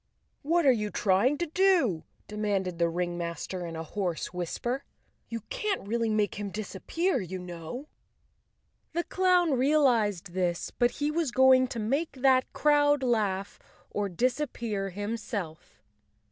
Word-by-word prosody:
"What 335 +3 +2
are 270 - +8
you 210 -4 0
trying 205 +9 +2
to 345 - -1
do?" 335 - +2 0.2
demanded 200 -4 -2
the 170 - +4
ring¬ 175 +1 -2
master 170 +1 -4
in 165 - -6
a 160 - -4
hoarse 175 0 -3
whisper. 240 +9 -3 0.5
"You 230 -1 -4
can't 400 - -2
really 230 +1 0
make 210 -2 0
him 205 -1 -3
disappear, 225 - -2
you 185 0 -5
know." 180 - -7 1.1
The 345 +1 0
clown 365 -3 +3
realized 245 - +2
this, 180 -2 -1
but 240 -1 +2
he 290 +3 -2
was 325 -2 0
going 255 +1 +5
to 240 - -5
make 275 +10 -1
that 260 -1 +3
crowd 290 -1 +3
laugh—or 205 -2 -2
disappear 235 - -1
himself. 205 - -5
220 Hz, 135 wpm, -28 LUFS, 185-275 Hz, 1.1 s, are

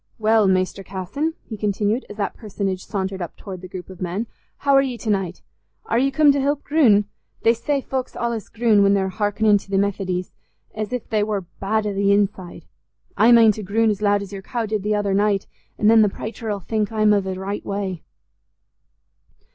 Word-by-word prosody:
Well, 220 -1 +3
Mester 185 +1 +1
Casson," 195 - -3
he 220 - -6
continued, 210 +3 -1
as 205 - -9
that 200 -2 -2
personage 195 -4 -4
sauntered 190 -2 -3
up 175 - -6
towards 185 -3 -8
the 185 - -8
group 180 0 -8
of 185 -1 -12
men, 185 +5 -2 0.3
"how 280 -1 +1
are 275 - +7
ye 260 -3 -3
t' 220 - -2
naight? 190 -3 -2 0.4
Are 230 - +1
ye 270 +2 +3
coom 295 +1 +5
t' 280 - 0
help 285 +1 0
groon? 240 -10 +4 0.4
They 230 - +5
say 275 +4 -1
folks 260 -1 -4
allays 235 -3 -2
groon 225 -3 +3
when 200 0 +4
they're 190 -1 0
hearkenin' 205 +1 +2
to - - -16
th' 195 -1 +1
Methodys, 185 -2 -1 0.4
as 215 +1 -4
if 250 -2 -4
they 215 -2 +1
war 205 -1 -1 0.2
bad 215 +2 0
i' 205 - -1
th' - - -6
inside. 200 -2 0 0.5
I 230 +3 +5
mane 230 -2 +7
to 215 +1 -6
groon 220 +3 +2
as 205 0 -4
loud 205 -1 +2
as 200 - -10
your 195 - -6
cow 230 +3 -3
did 215 -1 -2
th' 210 +2 0
other 205 -1 0
naight, 200 0 +2 0.3
an' - - -2
then 225 0 +7
the 210 - +4
praicher 220 +2 -6
'ull 200 -1 -3
think 215 +3 -1
I'm 215 -1 +3
i' 205 - +3
th' 190 -1 -4
raight 195 +2 -4
way." 195 -4 -3
205 Hz, 210 wpm, -22 LUFS, 195-225 Hz, 0.5 s, are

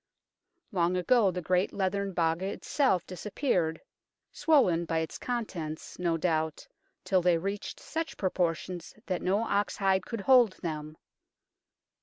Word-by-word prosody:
Long 180 -2 +1
ago 210 +3 +4
the 180 -1 -4
great 180 +3 +1
leathern 200 0 -1
Baga 170 +2 +1
itself 200 - +1
dis 185 - -8
appeared, 180 - 0 0.5
swollen 190 - +3
by 165 0 -1
its 160 0 -3
contents, 180 -13 -4
no 170 -2 +1
doubt, 160 -2 -1 0.4
till 185 -2 +3
they 175 -1 +4
reached 195 +4 -4
such 325 0 -4
proportions 180 -1 -2
that 185 -2 -2
no 200 +4 +1
ox 205 -2 0
hide 190 -1 +1
could 230 -3 -4
hold 245 -3 +5
them. 155 -2 -4
185 Hz, 135 wpm, -29 LUFS, 165-200 Hz, 0.5 s, hold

